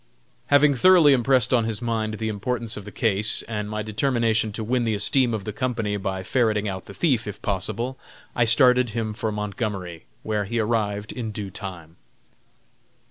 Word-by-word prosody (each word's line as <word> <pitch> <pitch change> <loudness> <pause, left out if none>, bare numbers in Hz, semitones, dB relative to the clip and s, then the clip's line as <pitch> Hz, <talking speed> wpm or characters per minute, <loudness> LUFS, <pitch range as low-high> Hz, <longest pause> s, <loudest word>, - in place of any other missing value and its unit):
Having 145 0 +5
thoroughly 170 -2 +6
impressed 130 0 +3
on 120 -3 +3
his 110 -2 -2
mind 110 -2 -2
the 110 +1 -3
importance 110 +2 -3
of 100 - -8
the - - -8
case 105 -2 0
and 105 -2 -4
my 105 0 -3
determination 110 -1 0
to 110 +2 -5
win 120 +2 0
the 110 -2 0
esteem 120 +5 +2
of 110 -3 -3
the 105 - -5
company 115 -2 -2
by 95 -2 -3
ferreting 110 -2 +1
out 95 -2 -5
the - - -11
thief, 130 -10 +1
if 105 - -6
possible, 115 +6 -3 0.4
I 120 - +3
started 125 +1 +5
him 110 0 -3
for 110 +1 -3
Montgomery, 100 -5 -4 0.2
where 105 -1 -1
he 115 +4 -3
arrived 105 -2 -1
in 115 -3 -5
due 100 -2 -6
time. 90 -5 -8
110 Hz, 180 wpm, -24 LUFS, 105-120 Hz, 0.4 s, thoroughly